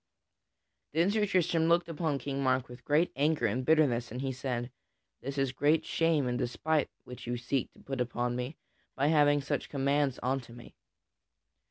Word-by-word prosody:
Then 170 +5 +3
Sir 210 -1 +1
Tristram 170 -3 +2
looked 170 0 +3
upon 160 -3 -1
King 140 0 -3
Mark 130 -1 +1
with 125 0 -12
great 150 +6 +2
anger 150 +3 +2
and 120 +5 0
bitterness, 125 -6 +3
and 125 - -5
he 135 0 -1
said: 125 -1 -3 0.5
"This 140 +2 -5
is 135 -2 +1
great 150 +4 +2
shame 165 -4 +2
and 125 0 -1
despite 150 +5 0
which 125 -1 -10
you 120 0 -1
seek 125 +2 -2
to - - -20
put 135 -2 -4
upon 120 0 -1
me 125 +5 -4 0.4
by 140 +2 +2
giving 145 -2 +4
such 140 - -3
commands 140 -1 +1
unto 125 -2 -2
me. 120 -1 -12
135 Hz, 175 wpm, -31 LUFS, 125-155 Hz, 0.5 s, giving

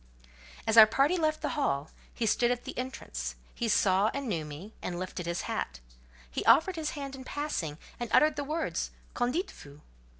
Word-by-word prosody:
As 220 +1 +2
our 220 -1 +12
party 275 +9 +3
left 310 -3 +1
the - - +1
Hall, 150 - -1 0.2
he 235 - -2
stood 240 +2 +3
at 245 0 -1
the - - -7
entrance; 255 +1 -4 0.2
he 235 - -2
saw 200 0 +4
and 280 -1 -3
knew 170 -8 -1
me, 155 +9 -9
and 175 - -3
lifted 180 -1 -5
his 170 0 -1
hat; 65 - -3 0.5
he - - -2
offered 365 +3 +6
his 315 -2 -2
hand 275 -1 -5
in 260 - -9
passing, 255 - -3 0.2
and 240 -1 -3
uttered 305 0 +5
the 290 - -2
words 310 +3 -2 0.2
"Qu'en 245 0 +1
dites 360 +7 -2
vous?" 145 +1 -13
245 Hz, 195 wpm, -30 LUFS, 180-290 Hz, 0.5 s, our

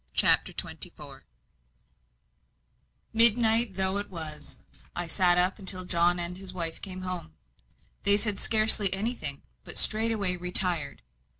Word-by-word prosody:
CHAPTER - - +2
XXIV - - -9 1.9
Midnight 225 -1 +7
though 190 +1 0
it 205 - -5
was, 160 -4 -8 0.4
I 175 - -4
sat 175 +1 +1
up 180 +4 0
until 185 -2 -3
John 175 0 -2
and 175 +1 -6
his 190 -1 -11
wife 165 -3 -6
came 185 -2 -10
home. 180 - -9 0.7
They 200 +1 +3
said 210 -1 -2
scarcely 215 -3 +1
anything, 195 - -5 0.2
but - - -11
straightway 215 -4 -1
retired. 180 -4 -2
185 Hz, 120 wpm, -24 LUFS, 175-210 Hz, 1.9 s, Midnight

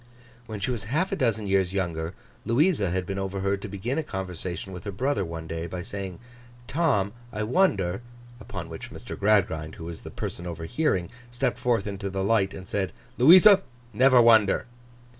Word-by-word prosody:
When 110 -2 -5
she 100 +6 -1
was 115 -5 -4
half 155 - 0
a - - +1
dozen 115 - 0
years 95 -2 +1
younger, 85 -2 -2 0.3
Louisa 125 - +2
had 90 +1 -1
been 95 +2 -3
overheard 95 0 -1
to - - -5
begin 105 +9 -3
a - - -1
conversation 95 - -5
with 90 0 -8
her 100 - -3
brother 125 +1 0
one 80 -1 -6
day, 80 +1 -4
by 90 +1 -5
saying 95 -2 -6 0.5
'Tom, 130 - +1 0.2
I 105 - -3
wonder'—upon 120 - -1
which 80 -1 -8
Mr. - - -8
Gradgrind, 95 -7 +1
who - - -9
was 85 -1 -7
the - - -8
person 85 - -5
overhearing, 85 - -1 0.2
stepped 125 +1 -1
forth 120 -5 +1
into 100 -1 -4
the 95 0 -2
light 100 -2 +2
and 95 0 -9
said, 100 -2 -2 0.3
'Louisa, 185 - +8 0.3
never 130 +3 +6
wonder! 110 -4 +5
100 Hz, 175 wpm, -26 LUFS, 95-120 Hz, 0.5 s, Louisa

